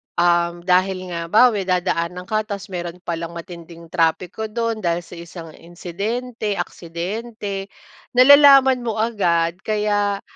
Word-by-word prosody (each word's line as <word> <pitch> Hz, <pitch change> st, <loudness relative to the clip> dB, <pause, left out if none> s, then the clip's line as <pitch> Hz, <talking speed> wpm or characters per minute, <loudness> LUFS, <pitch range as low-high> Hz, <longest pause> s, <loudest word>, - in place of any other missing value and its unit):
um, 170 Hz, 0 st, +1 dB
dahil 185 Hz, 0 st, +1 dB
nga 170 Hz, -, -3 dB
halimbawa, 235 Hz, +8 st, +6 dB
may 200 Hz, -3 st, -3 dB
dadaan 180 Hz, -1 st, -1 dB
ka 215 Hz, +2 st, -2 dB
tapos 200 Hz, -1 st, -7 dB
meron 175 Hz, 0 st, -6 dB
palang 170 Hz, 0 st, -5 dB
matinding 170 Hz, -1 st, -11 dB
trapiko 180 Hz, +5 st, -1 dB
dun 230 Hz, 0 st, -2 dB
dahil 170 Hz, -2 st, -1 dB
sa 175 Hz, -, -12 dB
isang 170 Hz, -1 st, -10 dB
insidente, 205 Hz, +6 st, -4 dB
aksidente, 195 Hz, +4 st, -5 dB, 0.5 s
nalalaman 270 Hz, -1 st, +7 dB
mo 225 Hz, -, -2 dB
agad 180 Hz, -6 st, 0 dB
kaya 205 Hz, -1 st, 0 dB
185 Hz, 130 wpm, -20 LUFS, 170-215 Hz, 0.5 s, nalalaman